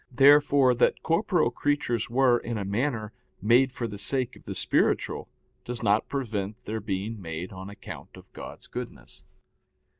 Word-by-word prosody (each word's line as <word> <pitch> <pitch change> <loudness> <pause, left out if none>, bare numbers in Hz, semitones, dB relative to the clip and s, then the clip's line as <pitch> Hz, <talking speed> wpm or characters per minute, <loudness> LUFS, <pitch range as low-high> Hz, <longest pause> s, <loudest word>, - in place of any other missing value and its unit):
Therefore 140 0 +6
that 120 - +2
corporeal 170 - +2
creatures 120 -4 0
were, 125 0 +4
in 120 -1 -4
a 100 - -3
manner, 110 +1 -1 0.3
made 120 +6 +4
for 120 -2 -3
the 100 -2 -8
sake 125 +5 -1
of - - -17
the - - -5
spiritual, - - +1 0.3
does 120 -1 -5
not 105 0 +2
prevent 110 -6 -3
their 110 +1 -3
being 105 +1 -3
made 85 +1 -5
on 95 +1 -8
account 100 - -10
of - - -16
God's - - -9
goodness. - - -8
115 Hz, 155 wpm, -27 LUFS, 105-135 Hz, 0.3 s, Therefore